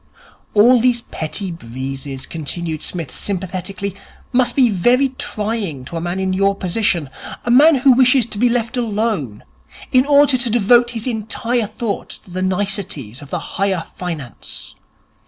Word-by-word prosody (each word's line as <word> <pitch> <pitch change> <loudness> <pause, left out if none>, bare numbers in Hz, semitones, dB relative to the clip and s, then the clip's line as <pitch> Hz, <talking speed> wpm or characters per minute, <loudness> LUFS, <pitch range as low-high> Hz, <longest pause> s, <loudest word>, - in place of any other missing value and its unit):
'All 240 +4 +6
these 240 -1 +3
petty 185 0 -4
breezes,' 135 -1 -6
continued 160 0 -4
Psmith 165 -7 -4
sympathetically, 190 +2 -3 0.4
'must 245 -1 +2
be 260 -3 +5
very 240 +7 +3
trying 210 - -4
to 170 - -7
a 165 - -2
man 175 +2 -2
in 190 0 0
your 195 +1 +2
position, 185 -4 0 0.4
a 240 - +1
man 295 +6 +7
who 265 +1 +5
wishes 255 -1 +5
to 215 -3 -6
be 245 +1 +4
left 235 -1 -1
alone 210 - -1 0.5
in 255 +1 +4
order 285 -2 +5
to 245 -1 -1
devote 240 +2 +4
his 230 -2 -4
entire 230 0 -1
thought 215 -1 -4
to 180 - -11
the 185 +1 -3
niceties 185 - -2
of 145 - -11
the - - -2 0.2
higher 190 -4 +1
Finance. 160 -9 -6
205 Hz, 155 wpm, -19 LUFS, 170-240 Hz, 0.5 s, man